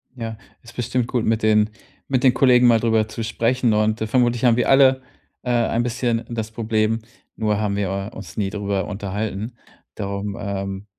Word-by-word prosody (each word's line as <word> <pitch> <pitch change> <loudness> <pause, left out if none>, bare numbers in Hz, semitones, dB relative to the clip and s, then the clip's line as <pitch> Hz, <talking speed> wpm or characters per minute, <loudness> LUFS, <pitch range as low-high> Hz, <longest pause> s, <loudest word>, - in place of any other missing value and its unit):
Ja, 115 -3 -5 0.3
ist 120 0 -14
bestimmt 125 0 -1
gut, 120 -3 -1
mit 110 0 +1
den 105 -1 +4 0.4
mit 130 -3 0
den 130 -2 +6
Kollegen 125 -2 +5
mal 115 -1 +5
drüber 110 -1 +2
zu 115 +1 -5
sprechen 115 +2 +1
und, 110 +1 +1
äh, 110 - -1
vermutlich 120 +1 +1
haben 120 -1 +5
wir 125 - +1
alle, 135 -1 +5 0.4
äh, 125 - -5
ein 120 -1 +1
bisschen 120 -1 -1
das 110 -2 -4
Problem, 110 0 0 0.4
nur 105 -2 0
haben 105 -2 -1
wir, 100 0 -2
äh, - - -15
uns - - -10
nie 100 -2 -1
drüber 100 -1 -2
unterhalten. 105 +3 -4 0.4
Darum, 100 0 -4
ähm, 100 -1 -4
110 Hz, 185 wpm, -22 LUFS, 105-120 Hz, 0.4 s, den